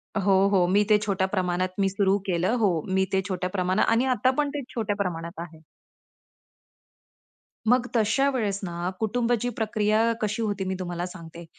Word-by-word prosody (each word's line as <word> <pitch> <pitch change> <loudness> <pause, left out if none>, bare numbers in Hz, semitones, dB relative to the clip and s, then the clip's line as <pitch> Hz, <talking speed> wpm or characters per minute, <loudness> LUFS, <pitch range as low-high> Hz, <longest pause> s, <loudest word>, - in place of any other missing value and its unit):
हो, 195 -1 +3
हो. 185 -3 +3
मी 200 +3 +3
ते 210 - +7
छोट्या 190 -2 0
प्रमाणात 185 -1 0
मी 195 -1 +3
सुरू 195 0 +2
केलं 185 +6 +1
हो, 195 - +4 0.2
मी 190 0 +3
ते 190 - +3
छोट्या 180 -1 -2
प्रमाणात 185 +1 +1
आणि 250 +3 +2
आता 255 +4 +2
पण 290 - +1
ते 285 - -2
छोट्या 215 -3 -1
प्रमाणात 170 -3 -4
आहे. 165 -2 -8 2.1
मग 250 0 +3
तशा 230 +5 +3
वेळेस 215 -7 -1
ना, 175 0 -3
कुटुंबाची 240 +2 0
प्रक्रिया 215 0 +1 0.2
कशी 215 +1 -1
होती 205 -3 -1
मी 190 - -2
तुम्हाला 175 -1 -3
सांगते. 170 -2 -10
195 Hz, 165 wpm, -25 LUFS, 180-215 Hz, 2.1 s, ते